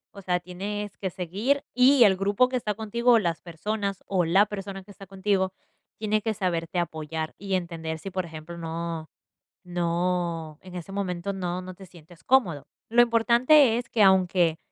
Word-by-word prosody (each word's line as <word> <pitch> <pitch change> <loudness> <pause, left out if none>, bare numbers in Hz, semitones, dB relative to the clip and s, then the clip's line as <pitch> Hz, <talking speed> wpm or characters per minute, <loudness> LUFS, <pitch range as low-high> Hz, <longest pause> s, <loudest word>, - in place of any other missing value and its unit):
O 200 - -9
sea, 180 -1 0
tienes 200 +4 -5
que 190 - -2
seguir, 200 - -1
y 255 0 +6
el 195 -3 +5
grupo 200 +6 +3
que 255 - -4
está 210 -4 -1
contigo, 235 +3 +2
o - - +7
las 170 -4 -2
personas, 200 +3 -4
o 185 -3 +1
la 190 +5 +5
persona 195 -2 -6
que 205 - -15
está 195 -1 -13
contigo 190 -1 0 0.4
tiene 215 0 0
que 220 -1 -2
saberte 175 -3 -2
apoyar 160 -1 -3
y 195 -1 -2
entender 165 -3 -3
si, 195 +3 -7
por 185 -1 -2
ejemplo, 160 +1 -9
no 165 -1 -5 0.6
no, 170 -2 -1
en 185 -1 -13
ese 180 +2 -7
momento, 195 -1 -3
no 180 -1 -3
no 185 - -8
te 190 +1 -13
sientes 170 -1 -17
cómodo. 185 - +2 0.2
Lo 240 - +5
importante 240 +2 +4
es 245 - -6
que 220 - +2
aunque 180 -4 +4
190 Hz, 180 wpm, -26 LUFS, 170-210 Hz, 0.6 s, o